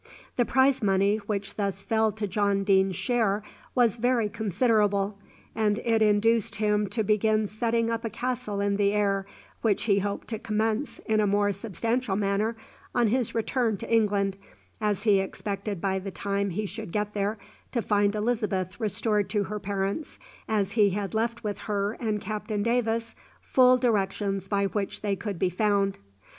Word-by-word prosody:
The 245 - +2
prize 265 +1 +3
money 200 0 +3
which 200 -2 -3
thus 200 -1 -2
fell 220 -1 +2
to 215 0 -3
John 200 0 +1
Deane's 190 -1 +3
share 215 -2 0 0.3
was 240 -3 +3
very 235 -2 +1
considerable, 205 -1 +1 0.3
and 210 -2 +1
it 225 -1 +1
induced 215 +1 +3
him 210 -1 +1
to 225 - -1
begin 215 +1 +2
setting 230 +2 0
up 230 0 -2
a 225 - -2
castle 225 -3 -3
in 200 0 +1
the 200 0 +2
air, 200 -2 +1 0.3
which 215 -4 +1
he 200 -2 +3
hoped 200 +1 -3
to 220 -3 -3
commence 220 +5 -1
in 220 -1 +2
a 210 - +3
more 205 0 +2
substantial 225 +3 -1
manner 205 +3 0 0.4
on 240 -3 +3
his 245 0 0
return 225 -1 0
to 230 - -4
England, 200 -3 +2 0.4
as 210 -2 0
he 205 -3 +4
expected 200 0 -4
by 190 +1 0
the 195 +1 -6
time 200 +1 -2
he 210 +4 -2
should 210 -1 -7
get 210 +1 -2
there 205 +2 -1 0.3
to 235 -3 -1
find 205 0 +2
Elizabeth 210 -5 -1
restored 210 -1 0
to 210 -2 +1
her 210 +2 -4
parents, 200 +7 -3 0.3
as 205 -3 0
he 210 -2 +4
had 195 +1 -3
left 230 +2 -1
with 205 -1 -3
her 205 -1 -1
and 215 -3 -1
Captain 210 0 -3
Davis 230 -1 0 0.3
full 255 -1 +5
directions 195 -4 0
by 200 0 +1
which 200 0 -3
they 205 -2 0
could 200 -1 -5
be 180 +1 +1
found. 200 0 +1
210 Hz, 170 wpm, -27 LUFS, 200-225 Hz, 0.4 s, full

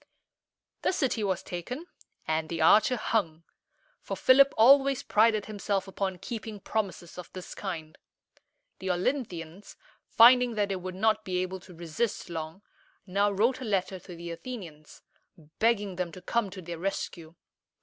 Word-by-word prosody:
The - - +1
city 260 - 0
was 190 -3 -1
taken, 245 - -6 0.4
and 160 0 -1
the 165 - -3
archer 215 +9 +5
hung; 190 -8 -1 0.6
for - - -5
Philip 275 +2 +6
always 270 +3 +6
prided 215 -1 +3
himself 200 -2 -2
upon 190 -1 -3
keeping 220 +1 -6
promises 190 -5 -4
of 180 - -9
this 185 -1 -8
kind. 160 -6 -6 0.8
The 190 - -4
Olynthians, 180 - -3 0.3
finding 245 +1 +6
that 205 -1 0
they 195 - -1
would 185 0 -6
not 215 +2 +2
be 185 -2 -2
able 185 +1 -5
to 180 0 -15
resist 170 +4 -3
long, 160 +4 -6 0.4
now 200 +2 +2
wrote 225 +7 +1
a - - -4
letter 190 -4 -1
to 180 -1 -11
the 170 0 -7
Athenians, 170 -5 -9 0.6
begging 205 -5 +1
them 180 -2 -2
to 185 - -10
come 235 -4 0
to 185 -1 -9
their 170 0 -6
rescue. 170 -3 -4
195 Hz, 150 wpm, -28 LUFS, 175-225 Hz, 0.8 s, Philip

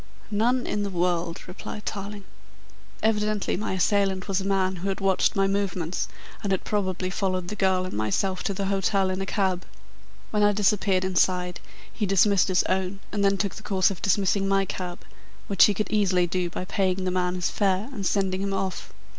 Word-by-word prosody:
"None 245 +4 +2
in 205 - -1
the 200 - -1
world," 175 -2 -1
replied 195 +3 -8
Tarling. 200 0 -5 0.8
"Evidently 210 -1 +1
my 210 0 -2
assailant 190 0 +1
was 195 0 0
a 195 - -3
man 190 -1 +1
who 190 +3 -3
had 195 - -2
watched 195 +1 +2
my 195 -1 +3
movements 190 -3 -1 0.3
and 200 -3 -2
had 190 - 0
probably 185 -3 -1
followed 185 -2 -1
the 210 - -4
girl 190 -2 +2
and 185 - -6
myself 110 - 0
to 200 - 0
the 200 +1 -2
hotel 195 0 +1
in 185 +1 -2
a 195 - -3
cab. 190 -3 0 0.7
When 210 - +1
I 205 0 +5
disappeared 195 -2 +2
inside 180 -1 +1 0.3
he 210 - -1
dismissed 195 0 +4
his 185 -1 +3
own 190 +1 -1
and 205 -1 0
then 195 0 +3
took 200 -2 -1
the - - -9
course 195 -2 +2
of 185 - -7
dismissing 195 0 +2
my 195 0 +2
cab, 180 -2 -5 0.4
which 195 -2 +6
he 205 - +2
could 215 - -2
easily 190 -4 +3
do 175 0 -1
by 180 - -5
paying 190 -1 0
the 185 - 0
man 180 0 0
his 180 -1 -1
fare 195 +1 +1
and 205 - -5
sending 190 -1 0
him 195 0 -1
off. 190 -1 -3
195 Hz, 195 wpm, -26 LUFS, 185-200 Hz, 0.8 s, which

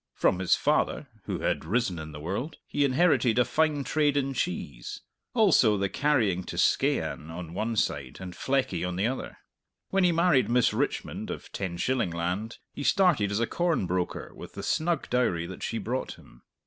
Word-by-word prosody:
From 90 - +2
his 95 - +3
father - - +1 0.2
(who - - -3
had - - 0
risen 95 0 0
in 80 0 -7
the 75 - -8
world) 100 - -4
he 145 - 0
inherited 135 -4 +3
a 125 - +5
fine 155 -2 +1
trade 145 0 +1
in 135 -1 0
cheese; 70 - -4 0.3
also 160 - +5
the 100 0 0
carrying 115 -11 +1
to - - -6
Skeighan 80 - +1
on 85 +2 -6
the 80 - -11
one 110 +4 -2
side 70 -9 -1
and 95 -1 -7
Fleckie 130 -10 0
on 90 0 -2
the 95 +3 0
other. 130 +3 -3 0.5
When 195 -1 +2
he 180 - +5
married 165 -7 +3
Miss 120 0 +3
Richmond - - -2
of - - -7
Tenshillingland, 95 +1 -2 0.2
he - - -6
started 150 - +3
as 100 +1 -1
a 115 - +2
corn 170 - 0
broker 90 0 -2
with - - -10
the - - -6
snug 165 -1 0
dowry 105 -10 +1
that - - -8
she 115 - -2
brought 120 +4 -3
him. - - -19
115 Hz, 185 wpm, -28 LUFS, 90-145 Hz, 0.5 s, a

